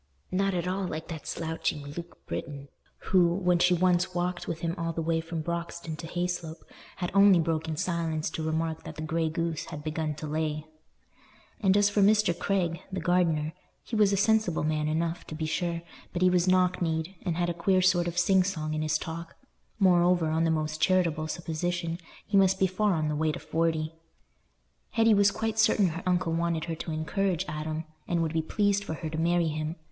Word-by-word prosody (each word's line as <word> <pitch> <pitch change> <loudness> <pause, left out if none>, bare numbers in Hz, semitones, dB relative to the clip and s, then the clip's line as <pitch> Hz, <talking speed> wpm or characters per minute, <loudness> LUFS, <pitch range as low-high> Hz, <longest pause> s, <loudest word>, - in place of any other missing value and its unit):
Not 195 +1 +1
at 175 0 -1
all 190 +1 -1
like 160 0 -5
that 160 -3 -7
slouching 160 -2 -2
Luke 170 +4 -9
Britton, 140 -2 -6 0.4
who, 175 -2 +5
when 180 -2 +2
she 180 +1 +4
once 180 0 +2
walked 175 0 -2
with 165 -1 -4
him 170 0 -1
all 165 -2 -2
the 165 - -5
way 165 0 +1
from 165 0 -4
Broxton 170 -1 -4
to 165 - -7
Hayslope, 175 -2 -3 0.3
had 175 -2 -3
only 195 -2 +7
broken 160 -1 -1
silence 165 -2 -1
to 160 - -4
remark 160 0 -1
that - - -8
the 155 - -5
grey 160 +1 0
goose 165 -1 -2
had 150 - -8
begun 155 0 -2
to 155 - -7
lay. 155 0 -2 0.9
And 195 -1 +3
as 205 0 +4
for 205 - +2
Mr. 210 -3 +4
Craig, 175 -2 -1
the 190 - -2
gardener, 165 -3 +1 0.3
he 230 - -5
was 210 -2 +4
a 200 - +2
sensible 215 -5 +2
man 155 0 0
enough, 165 +2 -1
to 155 - -6
be 155 0 -3
sure, 170 +1 -2 0.3
but 175 - 0
he 180 - +5
was 180 0 +2
knock 185 0 +3
kneed, 160 +1 -1
and 170 -3 -2
had 175 0 +1
a - - -3
queer 185 +2 +2
sort 175 -2 +3
of 175 0 -4
sing 190 +2 +4
song 155 -5 -3
in 155 - -1
his 155 0 +1
talk; 165 +1 -7 0.4
moreover, 175 -4 +4
on 160 +1 +2
the - - +2
most 155 -1 -1
charitable 165 -4 +2
supposition, 170 +1 -3 0.3
he 205 - -2
must 190 -1 +4
be 190 - +3
far 190 +1 +1
on 155 -1 0
the 150 - -1
way 155 +1 +1
to - - -5
forty. 160 0 -1 1.0
Hetty 225 -1 +5
was 200 0 +5
quite 220 +1 -2
certain 215 -4 +4
her 165 +2 -5
uncle 180 -2 +1
wanted 170 -1 0
her 165 -1 -3
to 165 - -5
encourage 180 +3 -1
Adam, 155 +1 -3 0.2
and 170 -1 +1
would 160 -1 -2
be 160 - +1
pleased 205 +4 +1
for 160 -5 -4
her 160 +1 -5
to 160 - -3
marry 170 0 +2
him. 155 +1 -3
170 Hz, 205 wpm, -28 LUFS, 160-185 Hz, 1.0 s, only